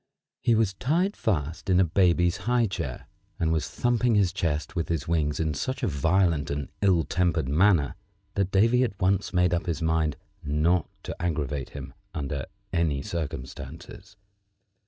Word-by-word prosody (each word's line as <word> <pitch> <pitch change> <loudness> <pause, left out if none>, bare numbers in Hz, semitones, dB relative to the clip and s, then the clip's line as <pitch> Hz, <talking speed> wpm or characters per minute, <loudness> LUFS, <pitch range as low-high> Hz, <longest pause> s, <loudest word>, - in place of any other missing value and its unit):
He 115 - +3
was 110 -3 +2
tied 165 - 0
fast 85 -4 -2
in 90 -1 +4
a - - +6
baby's 90 0 +3
high 125 -1 +3
chair, 100 - -4 0.3
and 80 -1 +1
was 80 -2 0
thumping 120 -1 +1
his 100 -4 +3
chest 80 +3 -2
with 85 -2 -2
his 80 -4 -1
wings 75 -3 0
in 80 -2 0
such 130 - -3
a - - +2
violent 85 -1 +2
and 70 -1 -3
ill 95 -5 +4
tempered 85 -2 0
manner 80 -1 +3 0.4
that 100 -2 0
Davy 115 +6 +4
at 100 -6 -3
once 95 +1 +1
made 90 -1 +2
up 85 +2 -1
his 85 -4 -1
mind 80 -3 +1 0.3
not 75 +3 +1
to - - -5
aggravate 75 -5 -2
him 65 -1 -8 0.2
under 70 -2 -3 0.3
any 75 -5 +1
circumstances. 80 +4 -6
85 Hz, 160 wpm, -27 LUFS, 75-95 Hz, 0.4 s, a